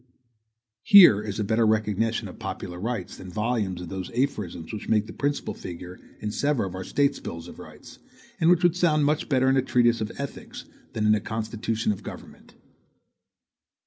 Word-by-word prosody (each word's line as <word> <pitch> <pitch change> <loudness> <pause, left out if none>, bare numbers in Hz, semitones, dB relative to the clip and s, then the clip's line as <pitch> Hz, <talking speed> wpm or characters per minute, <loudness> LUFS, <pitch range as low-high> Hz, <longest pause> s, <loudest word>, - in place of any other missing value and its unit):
Here 175 - +8
is 105 -1 -5
a - - +1
better 110 +3 +1
recognition 110 +1 0
of - - -12
popular 90 0 -6
rights, 110 -3 -4
than 95 - -9
volumes 105 -3 -2
of 90 - -7
those 95 -2 -5
aphorisms 105 -11 -2
which 105 - -6
make 105 -1 +3
the - - -10
principal 145 0 -2
figure 90 +1 -9 0.2
in 105 0 -3
several 140 -4 0
of - - -11
our 95 0 -5
State 140 +7 0
bills 85 0 -7
of - - -12
rights, - - -13 0.4
and 165 - +4
which 175 0 +4
would 175 -1 +4
sound 155 -5 +2
much 150 +1 0
better 130 -2 +2
in 135 0 +4
a - - +4
treatise 120 -2 +2
of 110 - -3
ethics 140 -1 -7 0.3
than 110 - -1
in 105 - +5
a 105 - +1
constitution 110 0 -2
of 100 - -5
government. - - -11
110 Hz, 185 wpm, -25 LUFS, 100-135 Hz, 0.4 s, Here